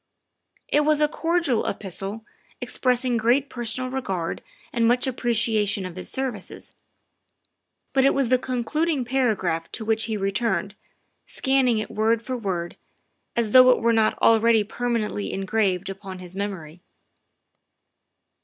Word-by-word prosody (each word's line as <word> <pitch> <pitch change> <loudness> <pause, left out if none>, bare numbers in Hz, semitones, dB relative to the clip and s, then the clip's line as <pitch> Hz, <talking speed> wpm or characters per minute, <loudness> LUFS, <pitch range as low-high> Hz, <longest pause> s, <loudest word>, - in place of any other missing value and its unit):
It 295 - +2
was 300 0 +3
a 300 - +4
cordial 325 -6 0
epistle, 200 +2 -5 0.4
expressing 250 -1 +1
great 245 +5 +2
personal 250 +1 -3
regard 190 -11 -3 0.3
and 230 -1 +2
much 245 +2 +2
ap 255 -2 -3
preciation 220 -4 0
of 180 -2 -7
his 185 - -7
services, 255 -7 -5 1.2
but 265 - +3
it 275 - +4
was 270 -4 +1
the 255 0 +4
concluding 260 +4 -1
para 250 -3 +1
graph 165 -3 -3
to 220 - -5
which 220 0 +1
he 220 -1 -2
returned, 195 0 -1 0.5
scanning 265 -4 +2
it 215 - -4
word 225 +1 +1
for 255 +2 -3
word, 185 -7 -3 0.6
as 230 -3 0
though 255 +1 +8
it 250 - +5
were 230 0 +2
not 220 -1 +2
already 225 -1 +5
permanently 220 -2 -2
engraved 195 -1 0
upon 195 -1 -7
his 180 0 -9
memory. 180 -5 -5
230 Hz, 140 wpm, -24 LUFS, 200-255 Hz, 1.2 s, though